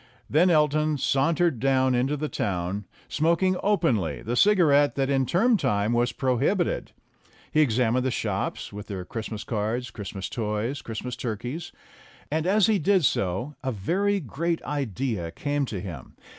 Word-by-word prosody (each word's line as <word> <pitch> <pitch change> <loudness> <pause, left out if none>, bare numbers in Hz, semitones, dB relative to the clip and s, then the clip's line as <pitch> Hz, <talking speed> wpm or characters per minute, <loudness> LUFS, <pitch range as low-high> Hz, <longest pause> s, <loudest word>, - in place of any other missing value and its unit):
Then 170 +6 +4
Elton 155 -1 +2
sauntered 145 +2 +1
down 130 0 +2
into 130 +4 +1
the 155 +2 -2
town, 95 -3 -2 0.2
smoking 170 +4 +2
openly 135 - +1
the 120 +3 -2
cigarette 145 -5 +4
that 135 0 0
in 135 -2 +2
term 225 +6 +3
time 105 - 0
was 120 +1 +2
prohibited. 135 - 0 0.6
He 155 - +4
examined 125 -2 +2
the 130 - +1
shops, 120 - -3
with 105 0 -8
their 95 -3 -5
Christmas 110 0 -5
cards, 110 +2 -2
Christmas 100 -2 -6
toys, 110 +4 -2
Christmas 120 +2 -5
turkeys. 120 +7 -5 0.6
And, 160 +2 0
as 205 +1 +4
he 215 -2 +2
did 185 0 +3
so, 100 +5 0
a 130 - -1
very 190 - 0
great 165 - -2
idea 125 - -2
came 145 - -2
to 100 - -4
him. 85 -8 -8
130 Hz, 150 wpm, -26 LUFS, 110-155 Hz, 0.6 s, Then